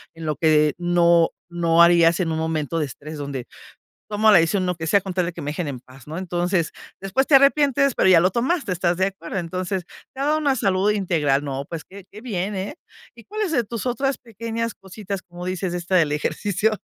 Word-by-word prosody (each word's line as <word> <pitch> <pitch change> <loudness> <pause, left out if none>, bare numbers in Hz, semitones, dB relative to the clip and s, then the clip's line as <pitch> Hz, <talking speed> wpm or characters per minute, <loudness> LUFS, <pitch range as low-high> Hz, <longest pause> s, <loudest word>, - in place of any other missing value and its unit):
en 165 0 -8
lo 155 -1 -1
que 150 -1 +3
no 170 -1 +4 0.2
no 170 -1 +3
harías 170 0 +5
en 165 -3 -1
un 160 - -1
momento 160 0 -2
de 155 - 0
estrés 150 +4 -9
donde 140 -4 -5 0.6
tomo 215 +1 +3
la 200 - +8
decisión, 175 +3 +1
lo 180 0 -1
que 160 0 -5
sea 200 - +4
con 190 -1 -6
tal 180 -1 0
de - - -3
que 170 - -8
me 145 0 -3
dejen 155 0 -3
en 130 -3 -6
paz, 130 +1 -17
¿no? 155 +2 -6
Entonces, 175 -1 -1 0.3
después 195 +8 0
te 290 - +6
arrepientes, 275 -1 +4
pero 190 - +3
ya 180 -3 +7
lo 180 +2 +3
tomaste, 255 - 0
¿estás 175 -1 0
de 190 +1 +2
acuerdo? 190 -2 -6
Entonces, 185 +1 -3 0.3
te 265 - -6
da 295 +2 +2
una 285 -3 +1
salud 195 -1 +2
integral. 160 -9 +1
No, 135 0 -4
pues, 165 -2 -6
qué 195 -1 -13
qué 210 - -11
bien, 205 -4 -3
eh, 190 +2 -4 0.4
¿y 230 - -14
cuáles 425 -3 -3
de 245 -6 +2
tus 230 +1 -5
otras 270 +2 -1
pequeñas 230 0 -5
cositas, 195 0 -7
como 175 -1 -10
dices, 185 -1 -3
esta 180 +1 -2
del 160 -5 +3
ejercicio?, 200 +8 0
180 Hz, 220 wpm, -22 LUFS, 165-210 Hz, 0.6 s, la